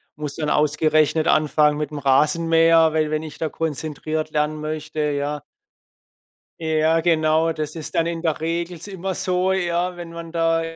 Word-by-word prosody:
muss 150 Hz, -1 st, -5 dB
dann 150 Hz, -2 st, -2 dB
ausgerechnet 155 Hz, +1 st, +2 dB
anfangen 150 Hz, 0 st, +3 dB
mit'm 150 Hz, 0 st, -4 dB
Rasenmäher, 165 Hz, +3 st, +4 dB
we 155 Hz, -1 st, +1 dB
wenn 155 Hz, 0 st, -2 dB
ich 155 Hz, -2 st, -9 dB
da 160 Hz, -, -1 dB
konzentriert 155 Hz, 0 st, -3 dB
lernen 150 Hz, 0 st, -1 dB
möchte, 155 Hz, 0 st, -5 dB
ja. 145 Hz, 0 st, -1 dB, 1.2 s
Ja 160 Hz, 0 st, +2 dB
genau, 160 Hz, -1 st, +2 dB
das 155 Hz, 0 st, -5 dB
ist 155 Hz, -1 st, -7 dB
dann 165 Hz, -, +2 dB
in 170 Hz, -1 st, -3 dB
der 160 Hz, -3 st, -1 dB
Regel 170 Hz, +2 st, -3 dB
s 170 Hz, -, -10 dB
immer 190 Hz, -1 st, -4 dB
so, 185 Hz, +1 st, 0 dB
ja, 180 Hz, -1 st, -1 dB
wenn 170 Hz, -1 st, -8 dB
man 170 Hz, -1 st, -8 dB
da 165 Hz, -1 st, +1 dB
160 Hz, 160 wpm, -22 LUFS, 150-165 Hz, 1.2 s, Rasenmäher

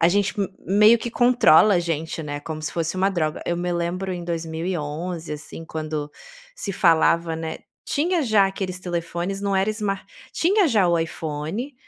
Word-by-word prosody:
a 165 Hz, -, +5 dB
gente 200 Hz, +2 st, +1 dB
m 200 Hz, -, 0 dB, 0.2 s
meio 210 Hz, +4 st, +6 dB
que 240 Hz, -, -4 dB
controla 240 Hz, -6 st, +5 dB
a -, -, +4 dB
gente, 165 Hz, -1 st, -3 dB
né, 145 Hz, -1 st, -5 dB
como 155 Hz, 0 st, -6 dB
se 155 Hz, -, -4 dB
fosse 165 Hz, +1 st, -2 dB
uma 190 Hz, +1 st, +3 dB
droga. 155 Hz, -4 st, -1 dB
Eu 175 Hz, -, 0 dB
me 175 Hz, 0 st, -2 dB
lembro 180 Hz, +2 st, -2 dB
em 175 Hz, -1 st, -5 dB
2011, 165 Hz, 0 st, -4 dB
assim, 160 Hz, +2 st, -8 dB
quando 155 Hz, -2 st, -4 dB, 0.4 s
se 200 Hz, -, -4 dB
falava, 165 Hz, -1 st, +3 dB
né, 160 Hz, 0 st, -5 dB, 0.3 s
tinha 330 Hz, +3 st, +1 dB
já 215 Hz, -5 st, +4 dB
aqueles 190 Hz, -2 st, -4 dB
telefones, 175 Hz, +2 st, -3 dB
não 200 Hz, -1 st, 0 dB
era 190 Hz, +2 st, +2 dB
smar 205 Hz, -3 st, -3 dB, 0.3 s
tinha 375 Hz, 0 st, +3 dB
já 210 Hz, -7 st, +3 dB
o 170 Hz, -1 st, +3 dB
iPhone, 165 Hz, -, -4 dB
175 Hz, 175 wpm, -23 LUFS, 160-200 Hz, 0.4 s, meio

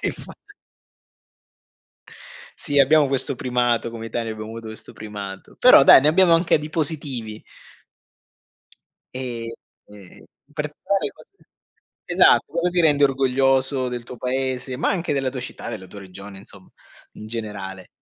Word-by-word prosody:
infa -, -, -5 dB, 2.3 s
Sì 145 Hz, -3 st, +2 dB
abbiamo 150 Hz, +2 st, +5 dB
questo 135 Hz, -1 st, 0 dB
primato, 120 Hz, -2 st, 0 dB
come 115 Hz, -1 st, -7 dB
Italia 115 Hz, -1 st, -3 dB
abbiamo 110 Hz, 0 st, -8 dB
avuto 115 Hz, 0 st, -8 dB
questo 110 Hz, 0 st, -10 dB
primato. 100 Hz, -2 st, -9 dB
Però 245 Hz, -, +8 dB
dai, -, -, +9 dB
ne 145 Hz, -, +3 dB
abbiamo 175 Hz, +2 st, +5 dB
anche 170 Hz, 0 st, +3 dB
di 150 Hz, +1 st, -7 dB
positivi. 140 Hz, -9 st, -3 dB, 1.7 s
Ehm, 120 Hz, -3 st, -5 dB, 0.4 s
e 100 Hz, -3 st, -15 dB, 0.3 s
per 150 Hz, 0 st, -4 dB
quali 200 Hz, -1 st, 0 dB
cose -, -, -19 dB, 0.7 s
esatto, -, -, +4 dB
cosa 170 Hz, +1 st, +1 dB
ti 175 Hz, 0 st, +1 dB
rende 145 Hz, -3 st, +4 dB
orgoglioso 135 Hz, 0 st, +1 dB
del 120 Hz, -1 st, -5 dB
tuo 125 Hz, +1 st, -10 dB
paese, 130 Hz, 0 st, -2 dB
ma 150 Hz, -, 0 dB
anche 175 Hz, -5 st, -1 dB
della 135 Hz, -2 st, -1 dB
tua 130 Hz, -, -6 dB
città, 125 Hz, -, -7 dB
della 110 Hz, -5 st, -6 dB
tua 100 Hz, +2 st, -12 dB
regione, 95 Hz, +1 st, -11 dB
insomma, 100 Hz, -1 st, -14 dB, 0.4 s
in 110 Hz, -, -11 dB
generale? 105 Hz, -4 st, -6 dB
125 Hz, 140 wpm, -22 LUFS, 110-145 Hz, 2.3 s, dai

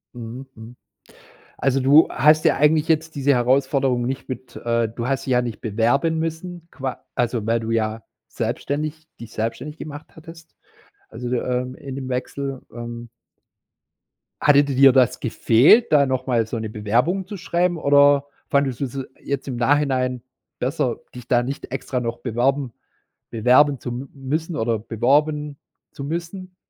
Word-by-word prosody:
Mhm, 120 Hz, +3 st, -8 dB
mhm. 115 Hz, +2 st, -12 dB, 0.8 s
Also, 135 Hz, 0 st, +1 dB
du 145 Hz, +5 st, +6 dB
hast 155 Hz, +4 st, +4 dB
ja 155 Hz, -, +4 dB
eigentlich 150 Hz, +1 st, +3 dB
jetzt 160 Hz, 0 st, +1 dB
diese 140 Hz, 0 st, +2 dB
Herausforderung 130 Hz, 0 st, +1 dB
nicht 135 Hz, +2 st, -4 dB
mit 130 Hz, 0 st, -7 dB
äh, 115 Hz, -1 st, 0 dB
du 115 Hz, +2 st, -5 dB
hast 135 Hz, 0 st, -2 dB
dich 130 Hz, -, 0 dB
ja 125 Hz, 0 st, +3 dB
nicht 120 Hz, -3 st, -5 dB
bewerben 120 Hz, +9 st, +1 dB
müssen, 165 Hz, +1 st, -5 dB
qua 130 Hz, -3 st, -6 dB
also, 120 Hz, -3 st, -1 dB
weil 115 Hz, +1 st, +1 dB
du 115 Hz, 0 st, -5 dB
ja 110 Hz, 0 st, -1 dB, 0.3 s
selbstständig 145 Hz, +7 st, -3 dB
dich 115 Hz, -, -10 dB
selbstständig 115 Hz, +7 st, -4 dB
gemacht 150 Hz, 0 st, -8 dB
hattest. 165 Hz, +1 st, -14 dB, 0.5 s
Also, 125 Hz, -, -6 dB
de 125 Hz, -, 0 dB
ähm, 125 Hz, 0 st, -2 dB
in 135 Hz, 0 st, -8 dB
dem 130 Hz, -1 st, -5 dB
Wechsel, 135 Hz, +1 st, -4 dB
ähm 120 Hz, 0 st, -7 dB, 1.3 s
hatte 145 Hz, -1 st, +6 dB
di 140 Hz, -2 st, -3 dB
dir 135 Hz, 0 st, +7 dB
das 130 Hz, -3 st, +3 dB
gefehlt, 125 Hz, -, +4 dB
da 145 Hz, -2 st, +5 dB
noch 130 Hz, -1 st, -2 dB
mal 120 Hz, -3 st, +2 dB
so 115 Hz, -, -4 dB
'ne 110 Hz, -1 st, -4 dB
Bewerbung 120 Hz, -, 0 dB
zu 205 Hz, +1 st, -7 dB
schreiben, 175 Hz, 0 st, 0 dB
oder 145 Hz, -1 st, +4 dB, 0.2 s
fandest 140 Hz, -3 st, +1 dB
du's 135 Hz, 0 st, -3 dB, 0.2 s
jetzt 140 Hz, 0 st, -3 dB
im 130 Hz, -, -3 dB
Nachhinein 130 Hz, -1 st, +1 dB, 0.4 s
besser, 130 Hz, -1 st, -1 dB, 0.2 s
dich 125 Hz, -1 st, -10 dB
da 120 Hz, -1 st, +3 dB
nicht 135 Hz, +3 st, -6 dB
extra 130 Hz, -1 st, -3 dB
noch 120 Hz, -1 st, -4 dB
beworben 125 Hz, +2 st, 0 dB, 0.6 s
bewerben 130 Hz, +5 st, +4 dB
zu -, -, -6 dB
m 125 Hz, +3 st, -6 dB
müssen 155 Hz, +5 st, -3 dB
oder 115 Hz, -1 st, 0 dB
beworben 145 Hz, +6 st, 0 dB, 0.4 s
zu 140 Hz, -, -7 dB
müssen? 175 Hz, +4 st, -5 dB
135 Hz, 160 wpm, -22 LUFS, 120-150 Hz, 1.3 s, dir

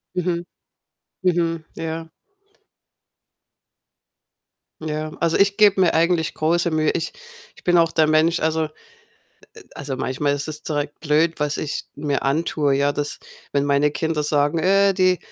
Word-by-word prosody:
Mhm, 175 Hz, -1 st, -1 dB, 0.8 s
mhm. 165 Hz, -3 st, 0 dB
Ja. 165 Hz, 0 st, -5 dB, 2.7 s
Ja. 155 Hz, 0 st, -3 dB
Also, 165 Hz, -1 st, +1 dB
ich 200 Hz, 0 st, +3 dB
gebe 205 Hz, -3 st, +5 dB
mir 180 Hz, -, +3 dB
eigentlich 165 Hz, 0 st, +2 dB
große 170 Hz, +2 st, +1 dB
Mühe. 155 Hz, -1 st, +2 dB
Ich 165 Hz, -, -3 dB, 0.4 s
ich -, -, -19 dB
bin 175 Hz, -1 st, +4 dB
auch 165 Hz, -1 st, +4 dB
der 160 Hz, -1 st, +3 dB
Mensch, 155 Hz, +2 st, +3 dB
also 160 Hz, 0 st, 0 dB
äh, 155 Hz, -, -15 dB, 0.9 s
also, 140 Hz, -3 st, -5 dB
manchmal 140 Hz, +3 st, -1 dB
ist 145 Hz, +1 st, -4 dB
es 150 Hz, -1 st, -7 dB
direkt 145 Hz, -1 st, -3 dB
blöd, 160 Hz, +2 st, +1 dB
was 150 Hz, 0 st, -1 dB
ich 150 Hz, -, -3 dB
mir 145 Hz, -1 st, -1 dB
antue, 145 Hz, 0 st, 0 dB
ja, 140 Hz, +1 st, +2 dB
dass 145 Hz, 0 st, -4 dB, 0.3 s
wenn 140 Hz, -1 st, +1 dB
meine 145 Hz, +1 st, +3 dB
Kinder 160 Hz, 0 st, -1 dB
sagen: 145 Hz, +1 st, +1 dB
„Äh, 195 Hz, +3 st, +3 dB
die 185 Hz, -1 st, +3 dB
160 Hz, 145 wpm, -22 LUFS, 150-170 Hz, 2.7 s, gebe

